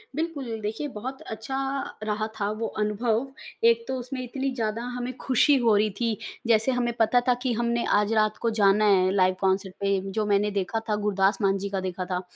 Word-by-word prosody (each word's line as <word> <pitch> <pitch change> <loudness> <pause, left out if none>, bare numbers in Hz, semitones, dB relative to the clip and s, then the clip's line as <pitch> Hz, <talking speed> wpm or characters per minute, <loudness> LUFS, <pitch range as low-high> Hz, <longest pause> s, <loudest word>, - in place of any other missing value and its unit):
बिल्कुल, 285 -9 -3
देखिए 220 +8 -3
बहुत 260 +5 -6
अच्छा 225 +5 -5 0.5
रहा 215 0 -1
था 200 - 0
वो 225 - -1
अनुभव, 220 +4 0 0.4
एक 230 0 +4
तो 265 - -2
उसमें 255 +1 -5
इतनी 270 +2 -3
ज़्यादा 225 -1 -2
हमें 250 +1 -4
खुशी 265 +3 +4
हो 230 -4 +3
रही 215 +1 +3
थी 230 -3 0 0.3
जैसे 225 +2 +3
हमें 245 -1 0
पता 245 +2 +4
था 250 - +5
कि 255 - +1
हमने 235 +1 0
आज 210 +1 0
रात 215 -1 +2
को 230 - +2
जाना 205 +1 +5
है 185 -2 +4
लाइव 185 -1 +3
कॉन्सर्ट 190 0 +1
पे। 200 -1 +2 0.2
जो 215 - +2
मैंने 205 0 +2
देखा 200 +3 -1
था, 210 - +2
गुरदास 195 0 +2
मान 195 -1 +2
जी 200 +1 -4
का 195 -1 -2
देखा 185 0 -4
था। 180 0 -2
215 Hz, 205 wpm, -26 LUFS, 200-240 Hz, 0.5 s, था